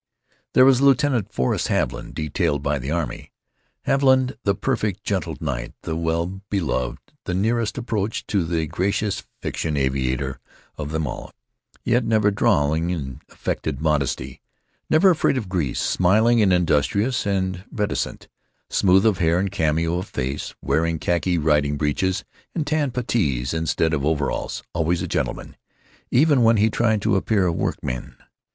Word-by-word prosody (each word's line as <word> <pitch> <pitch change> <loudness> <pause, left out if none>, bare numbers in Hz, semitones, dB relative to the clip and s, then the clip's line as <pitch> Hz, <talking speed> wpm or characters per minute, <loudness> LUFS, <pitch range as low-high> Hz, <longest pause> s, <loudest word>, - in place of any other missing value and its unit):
There 130 - +8
was 135 -1 +5
Lieutenant 135 -6 +3
Forrest 65 -9 0
Haviland, - - -2
detailed 75 -2 -1
by 70 0 0
the 65 +2 -5
army—Haviland 130 - -1
the 100 -1 +2
perfect 105 -4 -1
gentle 85 -7 -2
knight, - - -4
the 80 - -3
well 85 +3 -2
beloved, 70 -11 -1 0.3
the 90 - -2
nearest 115 +4 0
approach 110 -4 -2
to 100 -4 0
the 80 -1 -1
gracious 100 +5 -1 0.2
fiction 75 -2 -2
aviator 65 -1 -1 0.4
of 75 -1 -5
them 80 0 -1
all, 65 - -6 0.5
yet 120 +2 +2
never 110 -2 +3
drawling 85 -7 +2
in 70 -8 -4
affected 70 -4 -3
modesty, 75 -3 -1 0.5
never 185 +5 +6
afraid 155 -5 +2
of 110 -6 -3
grease; 85 -9 -1
smiling 110 +6 +3
and 100 -3 +4
industrious 90 - +1
and 95 -2 -1
reticent; 105 -2 -2 0.4
smooth 95 +2 +4
of 105 -5 +3
hair 85 0 +3
and 95 +1 0
cameo 80 +2 0
of 95 - -6
face; 65 +3 -4
wearing 85 +1 +1
khaki 85 +2 0
riding 75 -2 +2
breeches 85 +6 0 0.3
and 160 -4 -1
tan 150 -1 +1
puttees 85 - -1
instead 80 0 0
of 70 -3 0
overalls; 75 -2 -1
always 85 +1 0
a - - -3
gentleman, - - -3 0.5
even 140 +1 +4
when 115 -1 +5
he 110 +2 +3
tried 110 -3 +1
to 105 -2 +2
appear 100 0 +2
a 90 - +2
workman. 60 -6 -3
90 Hz, 145 wpm, -23 LUFS, 75-110 Hz, 0.5 s, There